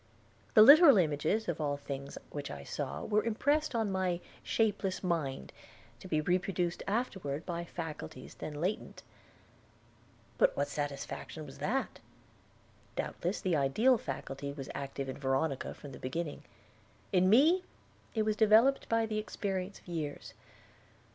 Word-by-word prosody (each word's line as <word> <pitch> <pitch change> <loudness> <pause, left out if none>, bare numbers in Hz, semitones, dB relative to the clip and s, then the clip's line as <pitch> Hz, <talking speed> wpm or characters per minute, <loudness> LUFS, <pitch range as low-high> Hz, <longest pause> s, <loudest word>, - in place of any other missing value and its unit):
The 215 - +10
literal 285 - +9
images 160 +5 +1
of 170 -2 -2
all 145 -1 0
things 140 0 -6
which 145 -1 -5
I 70 -1 -7
saw - - -4
were 210 -1 +2
impressed 285 +6 +1
on 220 -3 +1
my 185 -2 0 0.2
shapeless 205 -4 0
mind, 150 - -2 0.5
to - - -10
be 155 -4 +1
reproduced 180 +1 0
afterward 190 - -2
by 170 -1 -3
faculties 160 -6 -7
then 150 - -7
latent. 185 +6 -3 1.4
But - - +4
what - - 0
satisfaction 145 +2 -5
was 135 - -12
that? 260 +6 -1 1.0
Doubtless 180 +4 -2
the 180 -3 +1
ideal 215 - +3
faculty 135 +1 -5
was 140 -1 -7
active 140 0 -4
in 130 - -6
Veronica 135 +1 -1
from 145 - -10
the 125 - -10
beginning; 150 +4 -4 0.7
in 185 -1 +4
me 315 - +5 0.5
it 220 - +2
was 215 0 +1
developed 225 +6 +4
by 230 0 +2
the 215 -1 -2
experience 195 -2 -3
of - - -21
years. 155 -4 -5
180 Hz, 140 wpm, -32 LUFS, 145-215 Hz, 1.4 s, The